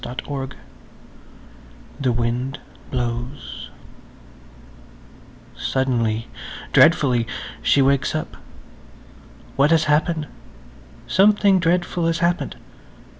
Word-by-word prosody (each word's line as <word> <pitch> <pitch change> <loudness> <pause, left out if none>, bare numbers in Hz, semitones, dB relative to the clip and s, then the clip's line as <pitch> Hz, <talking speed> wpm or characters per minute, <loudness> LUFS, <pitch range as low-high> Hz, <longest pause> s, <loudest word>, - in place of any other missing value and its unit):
[Page 125 +1 -6
137] 130 - -12
THE 130 -3 +1
WIND 120 +3 -2 0.3
BLOWS 120 +2 -4 1.9
SUDDENLY–dreadfully–she 125 +2 +1
wakes 140 +2 +2
up. 155 - -4 1.2
What 140 +2 +4
has 160 -1 +4
happened? 155 +1 +1 0.8
Something 200 0 +4
dreadful 175 0 +1
has 165 0 +1
happened. 170 +1 0
140 Hz, 70 wpm, -22 LUFS, 120-165 Hz, 1.9 s, What